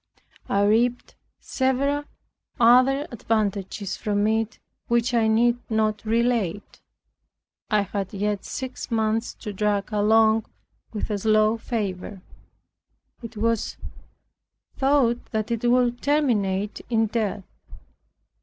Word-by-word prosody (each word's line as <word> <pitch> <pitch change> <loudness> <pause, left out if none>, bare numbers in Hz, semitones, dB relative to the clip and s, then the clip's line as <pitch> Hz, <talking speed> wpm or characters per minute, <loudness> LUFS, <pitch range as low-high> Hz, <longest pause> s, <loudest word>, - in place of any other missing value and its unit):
I 200 0 +2
reaped 235 +4 +1 0.3
several 275 +2 0 0.5
other 255 +5 +5
advantages 205 -3 -2
from 205 -1 0
it 220 0 0 0.3
which 235 +1 +1
I 230 -2 +3
need 235 +2 +3
not 215 -1 0
relate, 225 -4 -1 0.9
I 210 -2 +3
had 195 -1 -4
yet 205 0 -2
six 260 -1 -6
months 225 0 0
to 210 -3 -7
drag 205 +1 -1
along 220 +1 +3 0.4
with 215 0 -4
a 205 - -1
slow 215 +1 +3
fever. 200 -4 -4 1.0
It 230 -1 -9
was 230 0 -1 1.0
thought 265 -3 +2
that 220 +1 -2
it 235 +1 0
would 245 -1 +2
terminate 210 -9 0
in 225 -2 +2
death. 215 -2 -2
220 Hz, 105 wpm, -24 LUFS, 210-240 Hz, 1.0 s, other